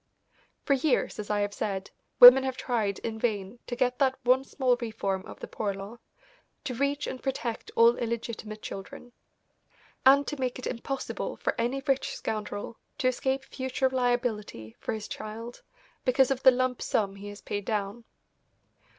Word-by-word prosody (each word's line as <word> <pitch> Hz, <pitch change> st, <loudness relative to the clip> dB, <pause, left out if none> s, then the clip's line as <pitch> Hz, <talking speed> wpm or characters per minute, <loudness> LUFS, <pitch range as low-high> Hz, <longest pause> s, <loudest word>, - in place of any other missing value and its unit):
For 280 Hz, -, +2 dB
years, 275 Hz, -3 st, +1 dB
as 210 Hz, -, -5 dB
I 210 Hz, -1 st, +1 dB
have 205 Hz, 0 st, -1 dB
said, 195 Hz, -2 st, -3 dB, 0.3 s
women 250 Hz, +2 st, +11 dB
have 260 Hz, -1 st, -2 dB
tried 220 Hz, -7 st, -1 dB
in 220 Hz, -1 st, -5 dB
vain 210 Hz, -1 st, -2 dB
to 245 Hz, -, -3 dB
get 250 Hz, 0 st, 0 dB
that 265 Hz, -2 st, +2 dB
one 255 Hz, +2 st, +4 dB
small 260 Hz, -2 st, +1 dB
reform 215 Hz, -5 st, -3 dB
of -, -, -11 dB
the -, -, -5 dB
Poor 200 Hz, -2 st, -3 dB
Law, 200 Hz, +5 st, -9 dB, 0.6 s
to 280 Hz, -4 st, -3 dB
reach 280 Hz, +3 st, 0 dB
and 255 Hz, -, -5 dB
protect 265 Hz, -4 st, -3 dB
all 230 Hz, +1 st, +6 dB
illegitimate 225 Hz, -2 st, -4 dB
children, 195 Hz, +5 st, -8 dB, 0.9 s
and 275 Hz, +2 st, +6 dB
to 295 Hz, -, -5 dB
make 255 Hz, -1 st, -1 dB
it 255 Hz, -, -7 dB
impossible 265 Hz, +3 st, -4 dB
for -, -, -1 dB
any 265 Hz, +4 st, -1 dB
rich 270 Hz, -1 st, 0 dB
scoundrel 215 Hz, +1 st, -4 dB, 0.2 s
to 260 Hz, -4 st, +2 dB
escape 265 Hz, +1 st, -1 dB
future 260 Hz, 0 st, -1 dB
liability 240 Hz, -, -1 dB
for -, -, -3 dB
his 215 Hz, -1 st, -5 dB
child 225 Hz, +3 st, -7 dB, 0.4 s
because 260 Hz, 0 st, +3 dB
of 265 Hz, -1 st, 0 dB
the 265 Hz, -, +9 dB
lump 255 Hz, 0 st, 0 dB
sum 195 Hz, -2 st, 0 dB
he 205 Hz, +1 st, -8 dB
has 205 Hz, 0 st, -10 dB
paid 205 Hz, -1 st, -4 dB
down. 210 Hz, +2 st, -2 dB
240 Hz, 170 wpm, -28 LUFS, 210-260 Hz, 0.9 s, women